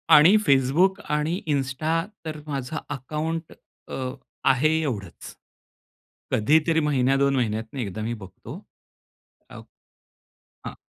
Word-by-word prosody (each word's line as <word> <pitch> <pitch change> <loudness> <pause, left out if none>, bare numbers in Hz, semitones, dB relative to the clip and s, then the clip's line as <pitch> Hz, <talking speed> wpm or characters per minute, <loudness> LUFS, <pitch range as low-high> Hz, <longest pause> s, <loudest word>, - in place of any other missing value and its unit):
आणि 160 +7 +8
Facebook 145 +9 +3 0.2
आणि 155 +5 -1
Insta 150 +5 0 0.2
तर 155 -1 -5
माझं 140 +1 -4
अकाउंट 155 +4 -4 0.3
अ, - - -6 0.5
आहे 135 +4 +4
एवढंच. 105 - -5 1.0
कधीतरी 160 +8 +3
महिन्या 135 -3 +2
2 140 0 +2
महिन्यातून 110 +1 -2
एकदा 110 -3 -4
मी 115 +2 -2
बघतो. 95 -5 -10 0.9
अ - - -12 1.1
हां. - - -6
140 Hz, 105 wpm, -25 LUFS, 125-155 Hz, 1.1 s, आणि